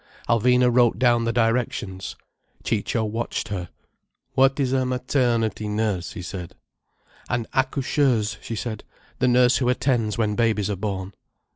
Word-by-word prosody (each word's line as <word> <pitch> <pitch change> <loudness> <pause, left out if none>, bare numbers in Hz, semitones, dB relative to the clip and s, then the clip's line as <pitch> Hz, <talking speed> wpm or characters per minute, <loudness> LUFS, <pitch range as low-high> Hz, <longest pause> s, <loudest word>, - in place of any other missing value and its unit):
Alvina 125 +2 +4
wrote 120 -2 +4
down 120 -2 +3
the 115 - +1
directions. 115 -5 -1 0.5
Ciccio 115 +1 -1
watched 115 +2 -3
her. 90 -4 -4 0.6
"What 135 +1 +3
is 130 -2 +1
a 130 -1 +2
maternity 125 -4 0
nurse?" 105 -4 -1
he 90 - -7
said. 90 -2 -7 0.7
"An 120 -1 -1
accoucheuse!" 130 -5 +1
she 115 - -5
said. 110 -1 -5 0.4
"The 130 - +3
nurse 125 0 +4
who 125 -2 +1
attends 120 -5 +1
when 110 -2 +1
babies 110 -3 +1
are - - -1
born." 95 -1 -4
115 Hz, 140 wpm, -24 LUFS, 105-125 Hz, 0.7 s, Alvina